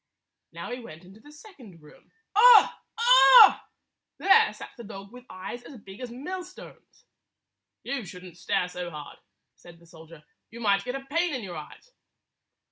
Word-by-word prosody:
Now - - -9
he 245 - -6
went 180 -8 -13
into 195 +4 -17
the 295 +6 -18
second 295 - -16
room. 150 -1 -21 0.2
Ugh! 465 +1 +7 0.7
Ugh! - - +3 0.6
There 445 +3 +4
sat - - -12
the 235 - -12
dog 200 -2 -11
with 250 0 -14
eyes 185 +6 -9
as 250 +2 -13
big 195 -2 -14
as 250 - -7
millstones. 360 +9 -11 0.8
"You 275 -4 -5
should 180 -1 -12
n't 175 -2 -14
stare 180 - -2
so 180 -1 -7
hard," 150 -3 -11 0.4
said 175 -1 -17
the 170 - -22
soldier. 165 -1 -16 0.3
"You 230 - -12
might 200 -2 0
get 250 +1 -5
a 270 0 -8
pain 330 +2 -2
in 250 - -6
your 180 -3 -8
eyes." 155 - -12
225 Hz, 170 wpm, -25 LUFS, 180-280 Hz, 0.8 s, Ugh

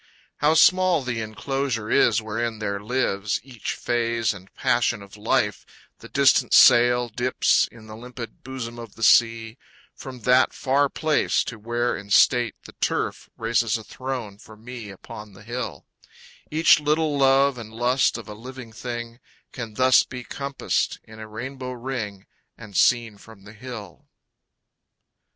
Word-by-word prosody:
How 150 +2 +3
small 185 -3 +4
the 120 -2 -3
enclosure 115 +1 -3
is 120 - +3
wherein 110 +1 -3
there 100 -2 -3
lives 105 -3 -1
Each 125 -4 -6
phase 115 -2 0
and 95 -1 -14
passion 120 -3 +1
of 100 0 -14
life, 105 -3 0 0.4
the - - -12
distant - - +4
sail 120 0 +6
Dips 120 +3 +2
in 115 -2 -15
the 110 0 -10
limpid 120 0 -9
bosom 120 -3 -6
of 115 -3 -10
the 115 - -7
sea, 115 +1 +3 0.3
From 130 -3 -10
that 125 +3 +4
far 140 +2 +1
place 155 +1 +1
to 115 - -7
where 120 +2 -1
in 100 0 -9
state 120 +2 +4
the - - -12
turf - - -2
Raises 115 0 +1
a 110 - -10
throne 120 -3 -6
for 110 0 -15
me 115 -1 -9
upon 105 +2 -11
the 105 - -15
hill, 120 +3 -5 0.6
Each 160 +1 +5
little 150 0 +1
love 135 -1 +4
and 110 -2 -9
lust 120 +4 +1
of 115 - -10
a 105 - -7
living 125 +1 -10
thing 120 0 -6 0.3
Can 115 -4 -7
thus 130 +1 +5
be 125 -1 -7
compassed 140 +2 -2
in 110 0 -14
a 110 - -8
rainbow 130 +4 -6
ring 115 -6 -5 0.3
And 105 -3 -12
seen 115 -3 +2
from 110 -2 -16
the 105 +1 -13
hill. 110 -5 -10
120 Hz, 155 wpm, -24 LUFS, 110-130 Hz, 0.6 s, sail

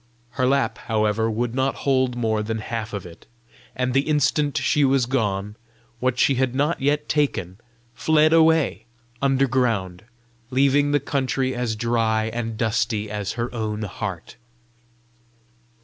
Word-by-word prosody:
Her 130 -2 0
lap, 135 -3 +1
however, 110 0 +1
would 115 +2 -2
not 130 +1 0
hold 130 -2 +2
more 110 -3 0
than 110 +1 -3
half 110 0 -4
of 100 -3 -5
it; 85 -1 -13 0.5
and 125 0 -1
the 135 +3 +1
instant 145 -1 +1
she 150 - +2
was 135 -2 +3
gone, 105 -5 -1 0.4
what 130 0 0
she 135 - +4
had 130 -1 0
not 145 +3 0
yet 150 +2 +1
taken 110 - -1 0.3
fled 155 +4 +3
away 160 -8 +3 0.4
underground, 125 -9 +1 0.4
leaving 140 +2 +3
the 145 0 +2
country 130 -1 -1
as 120 -3 -2
dry 110 -1 0
and 115 -2 -3
dusty 110 -1 -1
as 105 -2 -3
her 120 +1 -4
own 110 -2 -3
heart. 95 -2 -6
120 Hz, 140 wpm, -23 LUFS, 110-135 Hz, 0.5 s, she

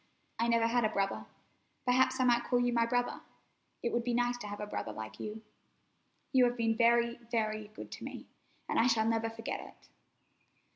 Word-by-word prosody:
I 230 - +2
never 230 -1 +3
had 240 +1 +2
a 215 - +3
brother. 195 -2 -1 0.6
Perhaps 255 +1 +3
I - - +4
might 240 -1 +3
call 245 - +2
you 245 0 +2
my 230 -1 +3
brother. 245 +1 0 0.6
It 235 - -1
would 235 - +1
be 240 0 0
nice 245 0 +2
to 210 - -6
have 205 0 -6
a 210 - -3
brother 160 - -4
like 110 0 -8
you. 215 +1 -6 0.9
You 255 -1 +6
have 245 0 0
been 225 -1 +2
very, 235 +1 +3
very 215 -2 -1
good 215 - -10
to - - -8
me, - - -7 0.4
and - - +1
I 230 - +5
shall 225 -3 +3
never 225 0 +1
forget 225 - -4
it." - - -13
235 Hz, 200 wpm, -32 LUFS, 220-245 Hz, 0.9 s, You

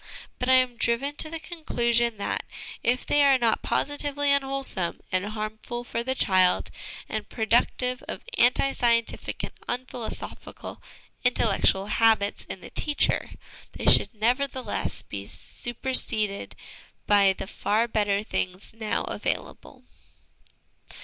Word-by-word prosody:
But 250 - -1
I - - +7
am 255 -2 +3
driven 240 +6 0
to 310 - +3
the 330 +1 -5
conclusion 235 -9 0
that, 200 - -2 0.4
if 250 +2 0
they 290 - +3
are 275 -1 +6
not 230 -3 +1
positively 290 0 -1
unwhole 275 -1 +1
some 175 -7 -3
and 185 0 +1
harmful 215 +3 -5
for 235 -1 -3
the 260 +2 -2
child, 185 -6 +3 0.4
and - - -4
productive 245 +2 +1
of - - -6
anti 265 - +4
scientific 235 -3 0
and - - -4 0.2
unphilosophical 245 -2 -6 0.4
intellectual 205 -5 +3
habits 215 -1 +2
in - - -7
the - - -10
teacher, 295 -2 +2 0.4
they - - -6
should - - +5
nevertheless 250 +4 -1
be - - -7
superseded 225 -4 -1 0.5
by 200 -2 +5
the - - -6
far 215 +3 0
better 205 -2 +1
things 185 -2 -3
now 220 -1 -1
available." - - -5
235 Hz, 125 wpm, -26 LUFS, 215-260 Hz, 0.5 s, I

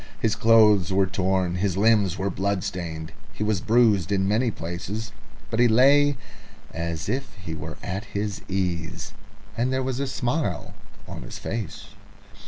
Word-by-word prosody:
His 110 -2 +1
clothes 105 -5 +5
were 95 +1 +3
torn, 95 -1 0
his 95 -1 0
limbs 100 -3 +3
were 95 +1 -1
blood 95 0 -1
stained, 85 -5 -5 0.2
he 100 - -3
was 105 -3 0
bruised 110 -6 +3
in 95 -1 +2
many 115 +5 +2
places, 100 +4 -5 0.4
but 110 - -1
he 120 - +6
lay 140 +5 +5 0.6
as 85 -1 -3
if 135 -5 -3
he 90 -6 -7
were 80 - -6
at 95 +4 -4
his 100 0 -3
ease, 90 -3 -2 0.4
and 120 +3 0
there 130 0 0
was 130 0 -2
a 140 - -1
smile 130 - -2 0.3
on - - -7
his - - -8
face. 115 -7 -5
100 Hz, 160 wpm, -25 LUFS, 90-115 Hz, 0.6 s, he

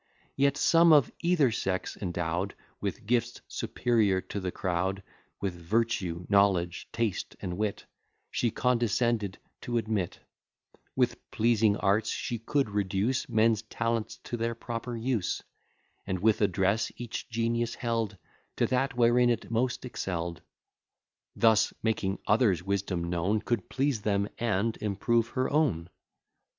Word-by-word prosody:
Yet 140 +1 +2
some 165 +2 +5
of 145 -5 +5
either 170 -7 +3
sex, 95 -3 -2
endow'd 85 0 -2 0.2
With - - -4
gifts 120 +1 0
superior 110 -6 +1
to 100 - -1
the 90 -2 -3
crowd, 95 +2 -1 0.4
With 100 -2 -2
virtue, 90 -1 -1
knowledge, 95 -4 +2
taste, 115 -4 -2
and 90 -1 -4
wit 105 +1 -2 0.5
She 120 - +1
condescended 120 -4 +1 0.2
to 120 -1 -1
admit: 110 -5 -1 0.8
With 125 -2 0
pleasing 110 -2 +3
arts 105 +2 +2
she 120 - -3
could 135 0 0
reduce 100 +5 0
Men's 110 -1 +3
talents 115 0 -2
to 120 - -4
their 115 0 -1
proper 115 +1 -5
use; 115 -4 -1 0.6
And 95 - -1
with 105 +4 +2
address 100 +2 +2
each 120 -1 -6
genius 115 0 0
held 115 -4 -2 0.4
To - - +2
that 130 0 0
wherein 120 +1 +5
it 115 -1 -1
most 125 +3 0
excell'd; 85 -8 -4 0.9
Thus, 110 -2 +4
making 100 -3 0
others' 105 -5 +3
wisdom 95 -2 -1
known, 90 +5 +1
Could 115 -3 -2
please 130 -3 0
them, 100 -1 0
and 115 -1 +1
improve 110 +3 +1
her 130 - +2
own. 120 - +1
110 Hz, 130 wpm, -29 LUFS, 95-120 Hz, 0.9 s, some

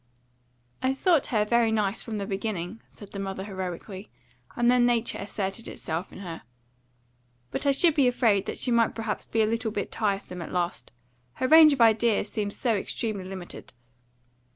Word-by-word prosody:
"I 260 +1 +1
thought 330 0 +3
her 215 -3 +1
very 235 0 +3
nice 210 -1 0
from 220 -2 -5
the 200 - -3
beginning," 195 0 -4
said 205 - -13
the 200 - -6
mother 195 -1 -4
heroically; 190 0 -6 0.5
and 240 0 +3
then 250 -1 +4
nature 235 -1 +1
asserted 200 +2 -4
itself 165 +3 -5
in - - -10
her. 170 -4 -7 1.1
"But - - -2
I - - +6
should 325 +4 +4
be 280 -4 +4
afraid 225 -5 +2
that - - -4
she 250 - 0
might 230 -1 +3
perhaps 225 -2 -3
be 225 -1 +1
a - - +3
little 225 +1 -1
bit 205 -2 -4
tiresome 195 -4 -2
at 165 - -7
last; 175 -1 -2 0.4
her 255 - -1
range 315 +1 +9
of 265 - -1
ideas 225 -2 +3
seemed 205 -2 -2
so 240 -3 +1
extremely 205 -1 -3
limited." 185 -6 -8
215 Hz, 175 wpm, -27 LUFS, 195-235 Hz, 1.1 s, range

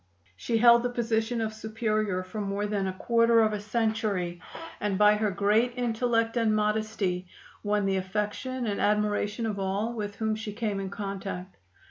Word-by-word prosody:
She 225 - -1
held 235 +1 +7
the 245 - -1
position 230 -1 -1
of 220 -1 -2
Superior 215 -3 -1
for 195 +4 -6
more 200 +1 -2
than 205 -2 -1
a 190 - -2
quarter 230 +3 +3
of 215 -1 +2
a 210 - -2
century, 210 -5 -1 0.4
and 205 -2 -1
by 210 +1 +6
her 210 0 +1
great 210 +5 +2
intellect 230 -1 0
and 225 -2 +2
modesty 210 -4 -1 0.3
won 205 -1 0
the 195 -1 +1
affection 210 +7 -3
and 205 -2 -1
admiration 210 +1 +1
of 210 -3 -2
all 200 +4 -1
with 205 -3 -4
whom 220 +1 -1
she 215 -1 -5
came 210 -2 -2
in 195 -1 -4
contact. 195 -2 -6
210 Hz, 170 wpm, -28 LUFS, 200-225 Hz, 0.4 s, held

